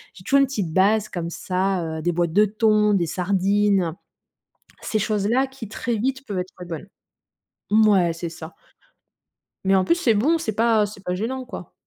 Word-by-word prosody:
J'ai 180 - -14
toujours 275 +8 +3
une 275 - +4
petite 200 - -3
base 205 +3 +3
comme 170 -4 -4
ça, 185 +1 -1 0.2
heu, - - -6
des 175 +2 0
boîtes 170 -1 0
de 210 +3 +5
thon, 215 0 +2
des 175 -3 +1
sardines. 190 +1 +1 0.9
Ces 215 - -1
choses-là 215 +5 +1
qui, 265 -5 -9
très 230 +2 -3
vite, 265 +4 -2
peuvent 200 -5 -3
être 180 +1 -5
bonnes 165 +1 -6 0.8
mouais, 205 -5 +4
c'est 170 +1 -5
ça 160 0 -10 1.1
mais 195 0 +4
en 190 - +3
plus, 335 - +2
c'est 270 -10 +2
bon, 280 +11 +2
c'est 220 -9 -3
pas 225 -1 +3
c'est 200 -1 -10
pas 180 -1 -2
gênant, 255 +6 -3
quoi. 210 -8 -9
205 Hz, 180 wpm, -23 LUFS, 180-225 Hz, 1.1 s, de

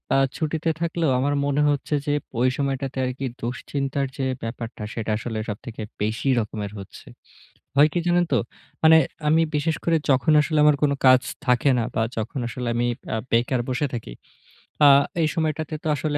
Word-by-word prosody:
আ - - +4 0.2
ছুটিতে 160 +1 -1
থাকলেও 165 -3 0
আমার 145 +2 +1
মনে 145 +1 +1
হচ্ছে 145 +1 -1
যে 145 - 0 0.3
ওই 130 +1 +4
সময়টাতে 135 -1 -2
আরকি 130 +2 -4 0.2
দুশ্চিন্তার 135 +3 -2
যে 135 - -1 0.2
ব্যাপারটা, 115 -1 -6
সেটা 110 -1 -3
আসলে 110 0 -4
সবথেকে 110 +2 -7 0.2
বেশি 110 +6 -1
রকমের 105 -2 -4
হচ্ছে। 95 - -12 0.7
হয় 150 +2 +7
কি - - 0
জানেন 175 0 +3
তো? 125 - +4 0.4
মানে 160 0 +8 0.3
আমি 160 +2 +4
বিশেষ 155 +2 0
করে 165 -1 +3
যখন 135 +4 +3
আসলে 155 0 0
আমার 150 -1 +5
কোন 145 -1 +3
কাজ 130 0 +7 0.2
থাকে 125 +3 +3
না। 115 - 0
বা 110 - +1
যখন 115 +6 -3
আসলে 125 0 -4
আমি 120 +1 +1 0.3
আ - - 0 0.2
বেকার 120 +2 +2
বসে 130 +3 0
থাকি, 110 - -6 0.7
আ - - +9 0.3
এই 155 - +3
সময়টাতে 155 -1 -2
তো - - -3
আসলে 145 +2 -1
135 Hz, 175 wpm, -23 LUFS, 120-150 Hz, 0.7 s, আ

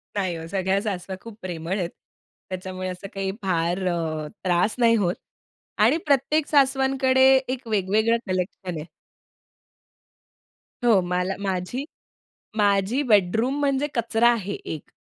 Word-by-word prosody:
नाही 185 -4 -1
ओ, 165 - -7
सगळ्या 190 +2 0
सासवा 190 -3 -4
खूप 230 -2 -11
प्रेमळ 175 +1 -3
आहेत. 175 -2 -1 0.6
त्याच्यामुळे 185 0 -5
असं 185 +2 -7
काही 195 -1 -2
फार 180 0 0
अ, 175 -1 0 0.5
त्रास 180 +3 +2
नाही 230 -1 +5
होत. 185 -5 +1 0.6
आणि - - +4
प्रत्येक 290 +2 +2
सासवांकडे 265 -2 +3 0.2
एक 255 -1 -4
वेगवेगळं 215 +2 +2
कलेक्शन 185 -1 -3
आहे. 150 - -8 2.0
हो, 225 -5 +5
मला 180 +2 -1
माझी 195 +6 -2 0.7
माझी 205 +5 +2
बेडरूम 220 +6 +3
म्हणजे 280 0 +1
कचरा 235 -1 +3
आहे, 205 -4 -3
एक 155 - -7
200 Hz, 125 wpm, -24 LUFS, 180-240 Hz, 2.0 s, नाही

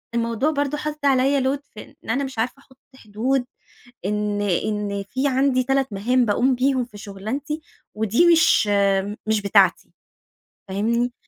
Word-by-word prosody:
الموضوع 235 +5 0
برضو 285 -1 -1
حاطط 300 -1 -5
عليَّ 270 0 +3
load 270 +2 0
في 215 - -12
إن - - -12
أنا 275 +4 0
مش 265 -4 -6
عارفة 235 +3 -1
أحط 265 -1 -23 0.2
حدود، 245 +3 -2 0.6
إن 210 +1 -1
إن 200 +1 -1
في 265 +3 0
عندي 265 -1 +2
3 270 +1 +1
مهام 245 +6 +1
باقوم 250 +5 +2
بيهم 260 0 +1
في 220 -4 -14
شغلانتي، 225 +10 -5 0.3
ودي 220 - +2
مش 325 -10 +4 0.6
مش 220 -1 +1
بتاعتي. 200 - +3 0.8
فاهمني؟ 235 +5 0
250 Hz, 145 wpm, -22 LUFS, 210-275 Hz, 0.8 s, مش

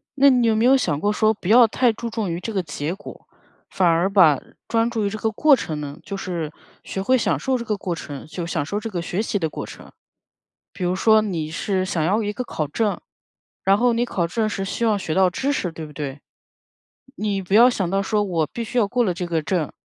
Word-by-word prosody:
那 280 0 +6
你 250 -3 +3
有 220 - +3
没 220 +2 +2
有 265 +2 +6
想 165 - -1
过 205 +5 +1
说 215 +1 +2
不 200 - -9
要 235 +3 +7
太 240 +2 +2
注 230 +2 -5
重 220 -4 -3
于 170 - -3
这 225 +5 -5
个 195 - +1
结 145 +1 -4
果， 205 - -12 0.4
反 185 - +1
而 170 +3 +3
把 180 -8 +5 0.3
专 230 0 +1
注 225 -3 -1
于 - - +1
这 215 - -5
个 220 +1 -1
过 290 +6 +5
程 160 -11 -4
呢。 145 -1 -6
就 200 - -6
是 170 -5 -4 0.3
学 190 - -4
会 255 +7 +3
享 235 - 0
受 265 -1 0
这 235 - -6
个 215 - -1
过 180 -3 -3
程， 145 -4 -8
就 170 +2 -5
享 165 -3 -2
受 205 +7 -2
这 225 - -5
个 180 -5 -3
学 175 +4 -2
习 215 -2 -1
的 160 -3 -1
过 - - -6
程。 - - -12 0.8
比 195 - -6
如 180 +1 +1
说 220 +3 +5
你 170 -7 -3
是 185 +3 -1
想 175 -4 -1
要 200 +7 +2
一 205 - -1
个 250 - -3
考 155 -10 -3
证， 205 +8 -1 0.6
然 195 +1 +4
后 240 +1 +3
你 235 +1 +1
考 175 -7 -1
证 220 +5 -1
是 195 -2 -3
希 215 +4 -2
望 215 -2 +2
学 165 -5 -3
到 190 +1 +4
知 270 +10 -1
识 180 -11 -2
对 160 0 -7
不 150 - -12
对？ 140 -1 -6 1.0
你 205 -2 -1
不 190 +2 -2
要 235 +3 +8
想 195 -7 -1
到 195 +2 0
说： 210 +2 0
“我 170 -5 0
必 230 +9 -5
须 245 +3 -2
要 210 -4 +3
过 245 +2 +1
了 185 - +1
这 180 0 -4
个 165 -2 -1
证，” 160 -1 -1
195 Hz, 270 characters per minute, -22 LUFS, 170-225 Hz, 1.0 s, 要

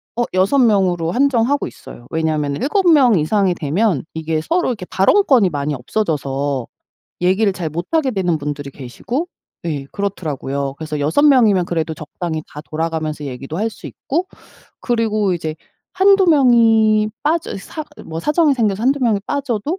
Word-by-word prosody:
어 240 - +1
6 190 +9 +2
명으로 185 -8 +2
한정하고 275 +1 +1
있어요. 120 - -13
왜냐하면은 155 -2 -1
7 350 +6 +2
명 255 - +5
이상이 185 +4 +1
되면 170 - 0
이게 160 -1 -2
서로 345 - 0
이렇게 205 -7 -4
발언권이 235 - +3
많이 145 -1 -2
없어져서 140 - -2 0.5
얘기를 190 +3 +2
잘 170 -4 -4
못 170 +4 -4
하게 310 -5 +2
되는 180 -7 0
분들이 145 -1 -5
계시고 235 - -5 0.4
예 145 -5 -3
그렇더라요. 140 -8 -3
그래서 155 -2 -4
6 155 - +2
명이면 225 -11 +5
그래도 160 -2 -2
적당히 160 +1 -5
다 150 - -9
돌아가면서 155 -1 -3
얘기도 135 +4 -6
할 225 +2 0
수 - - -11
있고 340 +7 -3 0.5
그리고 215 -5 0
이제 160 -2 -4 0.4
1-2 390 0 +4
명이 225 -7 +4
빠져 315 -4 -1
사 305 +10 -7 0.2
뭐 165 +1 -5
사정이 300 - +2
생겨서 215 -3 0
1-2 275 +2 +2
명이 215 -4 +2
빠져도 280 - -2
190 Hz, 325 characters per minute, -18 LUFS, 155-245 Hz, 0.5 s, 명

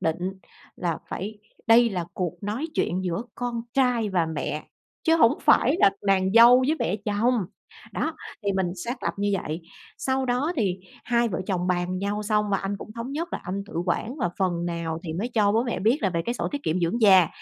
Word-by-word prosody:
định 175 +4 -1 0.4
là 170 -2 -2
phải 210 +3 -5 0.3
đây 235 +1 +6
là 180 -4 -2
cuộc 180 -4 -2
nói 215 +9 -2
chuyện 185 +2 0
giữa 180 +3 -1
con 240 -1 -3
trai 250 -5 +2
và 180 -4 +1
mẹ, 155 -1 -4 0.4
chứ 325 0 +4
hổng 230 -8 +4
phải 275 +6 +5
là - - +7 0.2
nàng 190 -1 +3
dâu 235 +3 +8
với 310 +3 +2
mẹ 190 - 0
chồng, 215 +4 +2 0.6
đó, 320 0 -2 0.3
thì 200 -1 0
mình 190 -2 0
xác 245 +2 -4
lập - - -1
như 205 0 0
vậy. 155 +3 -4 0.4
Sau 265 0 0
đó 255 +7 0
thì 195 -7 0 0.3
hai 235 0 +2
vợ 185 -2 -3
chồng 180 -2 -1
bàn 180 0 0
nhau 205 +2 -2
xong, 210 -1 +1
và 195 - +3
anh 195 +1 -3
cũng 215 - -10
thống 235 +3 -6
nhất 330 +4 -3
là - - -3
anh 190 +3 -3
tự - - -13
quản, 220 +8 -1
và 180 - -1
phần 175 -3 0
nào 170 -2 -3
thì 160 - -4
mới 195 +9 -2
cho 205 -3 +3
bố 225 +2 +3
mẹ 235 - -2
biết 225 +8 +3
là 195 - +2
về 170 -1 -1
cái 235 - 0
sổ - - -2
tiết 285 0 -3
kiệm 175 - 0
dưỡng 175 +8 0
già, 190 -6 +7
205 Hz, 220 wpm, -25 LUFS, 180-235 Hz, 0.6 s, dâu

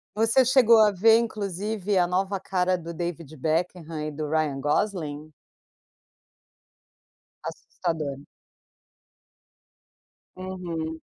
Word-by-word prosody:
você 225 +4 +4
chegou 240 -3 +6
a 215 -1 +6
ver 220 +4 +5
inclusive 205 -2 -2
a 180 -1 +4
nova 190 +2 -1
cara 185 -1 0
do 170 -1 -7
David 165 -2 -5
Beckham 165 +4 -1 0.2
e - - -3
do 150 0 -5
Ryan 150 -3 0
Gosling? 155 -1 -1 2.1
Assustador. 155 -6 -4 2.2
Uhum. 170 -4 -5
180 Hz, 90 wpm, -26 LUFS, 160-205 Hz, 2.2 s, chegou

